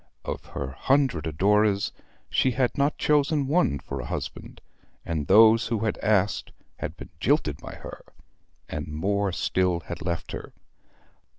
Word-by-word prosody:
Of - - -4
her 65 - -5
hundred 130 - +1
adorers 100 +5 +2 0.4
she 130 - +2
had 130 -1 +1
not 140 +1 +1
chosen 150 -1 +2
one 150 - +2
for 70 0 -6
a - - -7
husband; - - -6 0.5
and 80 -4 -2
those 110 +3 +6
who 115 -1 -1
had 110 - -1
asked 105 -1 +1 0.3
had 80 - -5
been - - -10
jilted 120 - +1
by - - -9
her; - - -9 0.7
and 75 0 -5
more 100 +6 0
still 90 -1 0
had 85 +1 -7
left 85 -1 -3
her. - - -7
100 Hz, 150 wpm, -26 LUFS, 85-125 Hz, 0.7 s, those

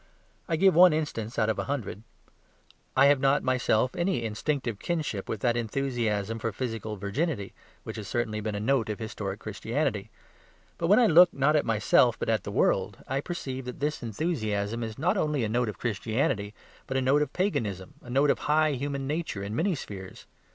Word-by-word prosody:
I 165 - +2
give 190 +4 +5
one 175 +1 +7
instance 125 -8 -3
out 110 - +2
of 110 - 0
a - - -2
hundred; 125 -8 -4 1.0
I 135 - +7
have 140 -1 +5
not 135 +2 +3
myself 125 -1 +1
any 175 -7 0
instinctive 115 0 -2
kinship 150 - -3
with 110 - -3
that 120 -1 +2
enthusiasm 115 -3 -1
for 115 0 -2
physical 110 -2 -4
virginity, 100 - -2 0.3
which - - -7
has 105 -3 -6
certainly 110 -2 -2
been 105 0 -3
a - - -2
note 115 0 +1
of 105 - -2
historic 105 -3 -5
Christianity. 110 +1 -2 0.7
But 165 - 0
when 205 +4 +6
I 245 - +6
look 175 -2 +7
not 140 +3 +3
at 150 - +2
myself 110 -3 +3
but - - -3
at - - +1
the - - -4
world, - - +1
I 135 +1 -1
perceive 130 -6 -5
that 125 - -7
this 150 +2 -1
enthusiasm 110 - -2
is 110 -1 -6
not 180 +8 +1
only 150 -7 0
a - - 0
note 120 0 +1
of 105 - -7
Christianity, 110 -2 -1 0.3
but 130 - -1
a - - +3
note 140 +3 +3
of 150 - -1
Paganism, 105 - -2
a 120 - -13
note 140 +3 +3
of - - -1
high 155 0 +4
human 140 0 -3
nature 150 -8 -3
in 100 +2 -4
many 175 +6 +1
spheres. 95 -8 -9
125 Hz, 195 wpm, -28 LUFS, 110-150 Hz, 1.0 s, one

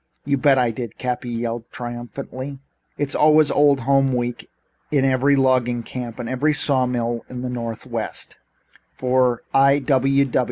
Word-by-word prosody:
"You 140 0 +1
bet 135 0 +3
I 125 -2 +2
did," 115 -1 -7
Cappy 125 -1 -3
yelled 115 0 -4
triumphantly. 130 +3 -7 0.4
"It's 145 -1 -2
always 155 0 +4
Old 145 -2 +4
Home 135 +1 +2
Week 120 -1 -3 0.4
in 140 -3 +2
every 135 +2 +3
logging 125 -3 +2
camp 120 -1 -6
and 130 +5 0
saw 130 -4 +2
mill 120 -1 -2
in 125 0 -6
the 125 - -3
Northwest 115 -1 -5 0.6
for 125 -2 +1
I. 140 +1 +4
125 Hz, 135 wpm, -21 LUFS, 120-135 Hz, 0.6 s, always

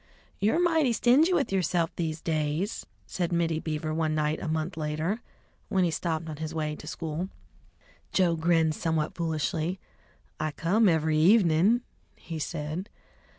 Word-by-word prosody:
"You're 220 +11 +2
mighty 325 -8 +3
stingy 265 +10 +4
with 285 - +1
yourself 175 -3 0
these 160 -2 -3
days!" 155 +5 -1 0.2
said 175 -2 -2
Mittie 165 -2 +1
Beaver 155 -1 -3
one 155 -1 0
night 155 0 0
a - - -4
month 160 +3 -2
later, 160 +8 -2 0.5
when 190 -1 +2
he 170 - +2
stopped 160 -1 -2
on 155 -2 -6
his 160 +1 -5
way 155 -1 -1
to 150 - -11
school. 165 +3 -4 0.8
Joe 175 -3 +3
grinned 165 -1 +2
somewhat 160 +2 -1
foolishly. 165 +1 -1 0.6
"I 155 -1 -1
come 200 +7 +3
every 160 -2 +2
evenin'," 190 +4 +5 0.3
he 165 -2 -7
said. 155 +5 -4
165 Hz, 150 wpm, -28 LUFS, 155-185 Hz, 0.8 s, evenin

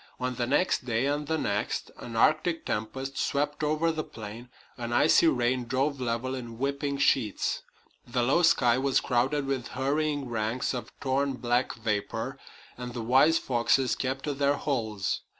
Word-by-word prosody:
On 125 0 -1
the 120 -1 -2
next 145 +5 +2
day 120 +1 0
and 145 +1 -1
the 160 - 0
next 105 -7 -2
an 115 - -7
Arctic 155 +7 +2
tempest 130 +6 -3
swept 145 +2 -1
over 155 +2 +2
the 155 -1 -3
plain, 115 -4 -9 0.3
an 120 -1 -4
icy 155 +6 +5
rain 125 -3 +1
drove 135 +3 -1
level 120 +2 -1
in 120 -3 -6
whipping 140 +2 -1
sheets, 130 -6 +1 0.5
the 120 0 0
low 140 +8 +3
sky 130 -8 +4
was 135 0 +2
crowded 135 +4 +1
with 135 -3 -2
hurrying 145 +1 0
ranks 115 +2 -1
of 125 - -5
torn 135 +1 0
black 125 0 0
vapor, 115 +4 -3 0.4
and 125 0 -6
the 120 - -3
wise 135 +7 +5
foxes 125 0 +2
kept 135 +1 -3
to 150 - -1
their 140 +1 +2
holes. 110 -9 -2
130 Hz, 165 wpm, -28 LUFS, 120-145 Hz, 0.5 s, icy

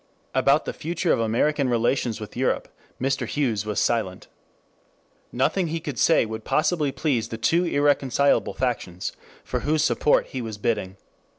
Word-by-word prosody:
About 140 +3 +3
the - - -3
future 170 +2 -1
of - - 0
American 130 +5 +1
relations 120 -1 0
with 105 -2 -8
Europe - - 0 0.3
Mr. 135 +1 -1
Hughes 115 -8 -1
was 105 - -1
silent. 105 -6 0 1.1
Nothing 165 +8 +1
he 165 +1 -2
could 145 -7 -5
say - - +4
would 110 0 -6
possibly 155 0 +1
please 130 -7 -1
the 115 - -5
two 165 +10 +2
irreconcilable 140 -3 +2
factions 105 -8 -2 0.3
for - - -2
whose 155 +1 +1
support 150 - +3
he 130 - -4
was 110 -3 -5
bidding. 100 -3 -2
130 Hz, 155 wpm, -24 LUFS, 115-150 Hz, 1.1 s, say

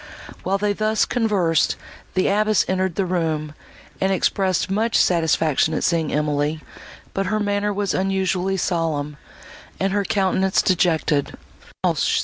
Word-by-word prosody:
While 195 +1 0
they 205 0 0
thus 215 +1 +1
conversed 195 -9 +1 0.4
the 185 - +2
abbess 215 +1 +2
entered 185 -2 -1
the 195 - 0
room, 160 -4 -1 0.5
and 190 0 +2
expressed 190 0 +1
much 220 +4 +1
satisfaction 160 -2 +2
at - - -2
seeing 165 -3 +1
Emily, 150 +1 0 0.5
but 195 -1 -1
her 215 +3 0
manner 205 0 0
was 200 -1 -1
unusually 190 0 0
solemn, 155 -5 -1 0.6
and 195 0 0
her 205 0 +1
countenance 190 -1 +1
dejected. 160 -5 +1
185 Hz, 130 wpm, -22 LUFS, 160-200 Hz, 0.6 s, the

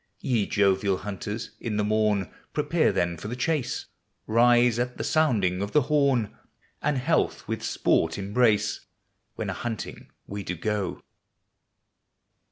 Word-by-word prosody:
Ye 120 -8 0
jovial 100 -1 +2
hunters, 105 +3 -5
in 110 -3 -3
the 105 - +2
morn 105 -3 +1 0.2
Prepare - - +2
then 85 -1 0
for 90 - -7
the 120 - -4
chase; 130 -1 -1 0.4
Rise 120 +1 +4
at 125 0 -2
the - - -3
sounding 105 - +2
of 100 +1 -3
the 150 - +5
horn 135 -6 +2 0.5
And 150 -2 +1
health 155 +6 0
with - - -3
sport 80 0 +1
embrace, 105 +2 +1 0.5
When - - -3
a - - -3
hunting 115 -4 -5 0.2
we 100 +1 -5
do 90 -2 -4
go. 105 +3 -2
110 Hz, 140 wpm, -26 LUFS, 100-125 Hz, 0.5 s, the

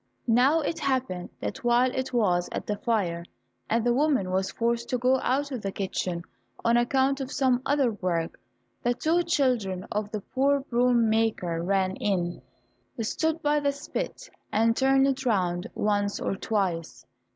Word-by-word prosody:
Now 255 +7 +4
it 325 +2 -2
happened 260 - -1
that 105 - -4
while 240 +1 +3
it 260 0 -2
was 180 -8 +1
at - - -4
the 210 - -1
fire, 190 -8 -1 0.5
and 230 +1 +1
the 240 - +3
woman 265 -9 +1
was 190 +1 0
forced 235 0 -1
to 250 - +1
go 255 +2 +3
out 280 +3 0
of 250 -4 -4
the 195 - -3
kitchen 185 -3 -3 0.4
on 235 0 +4
account 265 +3 +2
of 265 +1 -5
some 255 -3 +2
other 275 -4 +2
work, 180 -5 -2 0.4
the 245 0 +1
two 330 +6 +2
children 245 - 0
of 210 0 -2
the 215 -1 -4
poor 275 +6 +1
broom 240 -2 +2
maker 215 -7 0
ran 190 +1 0
in, 175 -4 -1 0.6
stood 320 +8 -1
by 295 0 +3
the 285 -1 +1
spit - - -5 0.2
and 225 +1 +3
turned 270 +1 +4
it 270 -1 0
round 180 -7 0
once 205 -1 0
or - - -1
twice. 190 -5 -2
235 Hz, 165 wpm, -27 LUFS, 195-270 Hz, 0.6 s, Now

